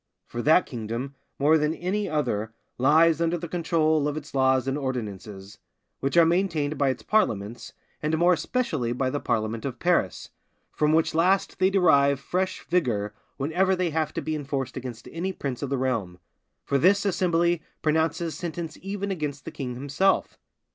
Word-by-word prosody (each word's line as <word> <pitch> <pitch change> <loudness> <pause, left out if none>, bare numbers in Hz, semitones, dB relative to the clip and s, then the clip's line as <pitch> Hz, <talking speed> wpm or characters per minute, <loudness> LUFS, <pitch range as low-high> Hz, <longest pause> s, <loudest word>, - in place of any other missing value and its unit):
For 120 - -5
that 160 +6 +5
kingdom, 120 +3 -5 0.2
more 155 +3 +4
than 150 +2 0
any 200 +4 -2
other, 110 -8 -1 0.2
lies 160 +4 +4
under 170 +1 +1
the 170 - -6
control 160 -3 +1
of 145 0 -2
its 150 0 -8
laws 130 -1 +2
and 135 - 0
ordinances, 105 -7 -5 0.4
which 135 +5 -1
are 170 - +8
maintained 165 -4 +1
by 140 -1 +2
its 125 -4 -3
parliaments, 115 - 0 0.3
and 155 +1 0
more 175 +2 +5
especially 160 - -1
by 130 +1 -1
the 145 - -1
parliament 110 -2 -1
of 130 -3 -4
Paris, 170 - 0 0.4
from 150 0 +1
which 160 +1 +2
last 180 +5 +2
they 185 0 +4
derive 140 -8 +4
fresh 185 +6 -2
vigour 115 - 0 0.2
whenever 180 +7 +1
they 180 -2 -1
have 155 -1 -1
to - - -3
be 155 - -2
enforced 135 -3 -3
against 125 -3 -7
any 175 +4 -2
prince 135 -8 -5
of 140 - -3
the 140 - 0
realm; 115 -9 -1 0.5
for 140 - +1
this 200 +6 +4
assembly 175 -3 +2 0.2
pronounces 160 +1 +1
sentence 165 -2 -5
even 200 +1 -3
against 150 -6 -4
the - - -6
king 125 -3 -5
himself. 145 +9 0
150 Hz, 170 wpm, -26 LUFS, 130-170 Hz, 0.5 s, are